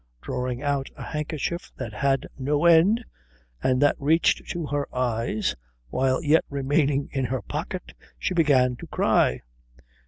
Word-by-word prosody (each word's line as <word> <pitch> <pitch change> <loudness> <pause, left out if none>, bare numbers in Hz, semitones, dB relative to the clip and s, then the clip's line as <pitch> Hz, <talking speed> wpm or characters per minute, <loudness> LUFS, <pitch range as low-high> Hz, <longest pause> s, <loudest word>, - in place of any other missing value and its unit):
Drawing 125 - -3
out 140 -2 -1
a - - -8
handkerchief 155 +2 -4
that 115 -5 -5
had 135 +4 +1
no 145 +4 0
end 180 +8 +5 0.6
and 130 -1 +2
that 145 - +4
reached 160 +4 +2
to 170 -2 -3
her 145 -1 -2
eyes 115 -3 -1 0.4
while 130 - +1
yet 155 +2 +4
remaining 140 0 +1
in 135 -2 -1
her 125 -3 -2
pocket, 175 +4 -5 0.2
she - - -2
began 135 -7 +3
to - - -9
cry. 60 - +2
140 Hz, 145 wpm, -25 LUFS, 130-155 Hz, 0.6 s, end